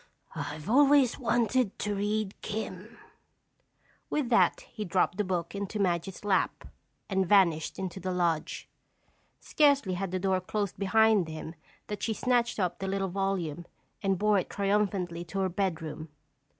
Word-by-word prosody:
"I've 150 +3 -5
always 275 +1 +5
wanted 235 -2 +1
to 210 0 -2
read 205 0 -1
'Kim'." 210 +1 -6 1.1
With 285 -5 -1
that 240 - +3
he 215 - -7
dropped 180 -1 +1
the - - +3
book 180 -3 -2
into 200 +1 -4
Madge's 185 0 -1
lap 195 -2 +1 0.4
and 190 -1 +1
vanished 170 -6 +3
into 190 0 -4
the 185 -1 -3
lodge. 170 -3 -1 0.7
Scarcely 280 -10 +3
had 190 +1 -2
the 185 - -2
door 185 0 +1
closed 200 +1 -3
behind 210 -1 +4
him 160 0 -7 0.3
that 210 -1 -6
she 220 - -1
snatched 240 0 +1
up 180 -1 -1
the 195 - -3
little 195 0 -1
volume 175 -4 -2 0.3
and 195 -2 +1
bore 210 +1 +3
it - - -4
triumphantly 195 -4 0
to 195 +3 -3
her 190 - +1
bedroom. 165 -4 -3
195 Hz, 150 wpm, -29 LUFS, 180-215 Hz, 1.1 s, always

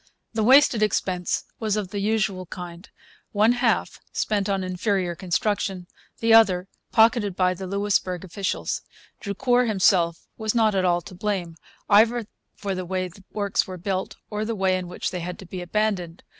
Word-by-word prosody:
The 220 - 0
wasted 260 -1 +6
expense 185 -4 0 0.2
was 215 -2 0
of 200 -3 -3
the 205 - -4
usual 195 -3 0
kind 175 +2 -9 0.4
one 215 +2 +4
half 245 -1 0
spent 205 -2 0
on 195 -1 0
inferior 185 0 -1
construction, 190 +1 -1 0.4
the 225 0 +4
other 195 -5 +5 0.2
pocketed 220 -4 +4
by 185 -1 +2
the 190 +1 -7
Louisbourg 195 -2 0
officials. 190 +1 -3 0.4
Drucour 245 +5 +1
himself 180 -5 +2
was 220 +1 -1
not 220 -2 +4
at 190 -1 +1
all 175 -1 +2
to 185 - -12
blame, 185 -3 -3 0.3
either 225 +3 +4 0.3
for 200 -2 -3
the 185 0 -3
way 185 0 -2
the 190 +3 -17
works 200 -2 0
were 185 -1 -6
built 190 +1 -3 0.2
or 210 0 -2
the 225 +1 -2
way 190 -2 +2
in 185 -1 -3
which 180 - -4
they 180 - -3
had 175 +1 -5
to 190 - -11
be 180 +1 -6
abandoned. 180 -2 -1
195 Hz, 170 wpm, -24 LUFS, 180-215 Hz, 0.4 s, wasted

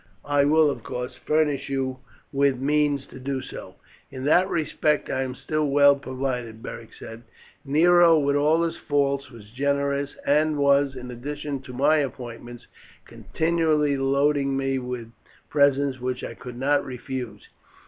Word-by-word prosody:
I 145 -1 +2
will, 155 0 +4
of - - -7
course, 125 +1 -5
furnish 150 -3 0
you 130 -1 -2 0.3
with 140 -1 +2
means 145 0 +1
to 130 - -12
do 135 +1 -3
so." - - -9 0.3
"In 130 - -8
that 175 +6 +3
respect 150 -2 0
I 130 - -1
am 130 -1 -3
still 155 +2 -1
well 140 0 +6
provided," 130 -4 -4
Beric 115 - -8
said. 115 +1 -10 0.4
"Nero, 165 +3 +5
with 140 -1 +1
all 155 +3 +3
his 165 - -2
faults, 140 -1 0
was 110 -4 -14
generous, 140 +2 -1
and 150 +1 +2
was, 140 -1 +3
in 125 -1 -7
addition 145 +2 -5
to 130 -1 -11
my 145 +5 +3
appointments, 120 -4 -5 0.4
continually 160 -3 0
loading 140 0 +1
me 135 0 0
with 125 -2 -6 0.4
presents, 140 -2 +2
which 125 0 -3
I - - -5
could 125 +1 -10
not 140 +3 +2
refuse. 125 -4 -7
140 Hz, 150 wpm, -24 LUFS, 130-145 Hz, 0.4 s, well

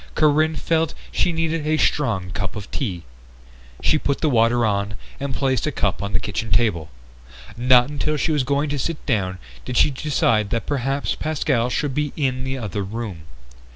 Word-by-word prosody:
Corinne 155 +1 +3
felt 160 +1 0 0.2
she 180 - +2
needed 165 -1 -1
a 155 0 +2
strong 110 -14 +1
cup 90 +1 -3
of 105 -1 -7
tea. 95 -11 -3 0.8
She 155 - +3
put 140 -1 0
the 155 - +2
water 120 0 +3
on 100 0 0 0.2
and 140 0 -3
placed 130 -3 0
a - - 0
cup - - 0
on 100 0 -3
the - - +1
kitchen 110 +1 -3
table. 85 -10 +2 0.7
Not 125 0 +5
until 150 +1 -1
she 160 - 0
was 150 -3 +2
going 140 +3 +1
to 145 -1 -2
sit 165 +4 -3
down 95 -8 0 0.3
did 125 -1 -3
she - - +5
decide 120 -7 +1
that 115 +1 -1
perhaps 135 0 -1
Pascal 140 -6 0
should 140 +2 -1
be 150 0 -1
in 130 -3 -1
the 130 0 -3
other 105 -4 -3
room. 100 -5 -6
130 Hz, 185 wpm, -22 LUFS, 110-150 Hz, 0.8 s, Not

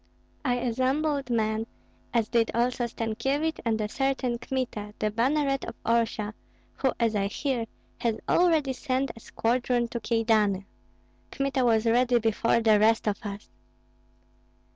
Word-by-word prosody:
I 250 -3 +1
assembled 260 +3 0
men, 220 -1 0 0.4
as 230 -2 +1
did 230 -1 +2
also 240 +1 +1
Stankyevich 270 +8 -1
and 225 -2 0
a 210 - -1
certain 265 0 -1
Kmita, 230 -6 -4
the 215 - 0
banneret 275 +4 +1
of - - -7
Orsha, 225 -2 0 0.4
who, 265 - +2
as 230 -2 +1
I 200 -1 +1
hear, 245 +2 -2 0.3
has 230 -2 0
already 320 -6 +3
sent 260 0 -1
a - - -11
squadron 240 +1 0
to 235 - -3
Kyedani. 220 -4 +1 0.6
Kmita 275 -1 0
was 225 -2 +3
ready 245 +2 +4
before 230 +1 +2
the 215 -2 +5
rest 220 +1 +3
of 205 - 0
us." 205 -2 -7
235 Hz, 140 wpm, -27 LUFS, 220-260 Hz, 0.6 s, the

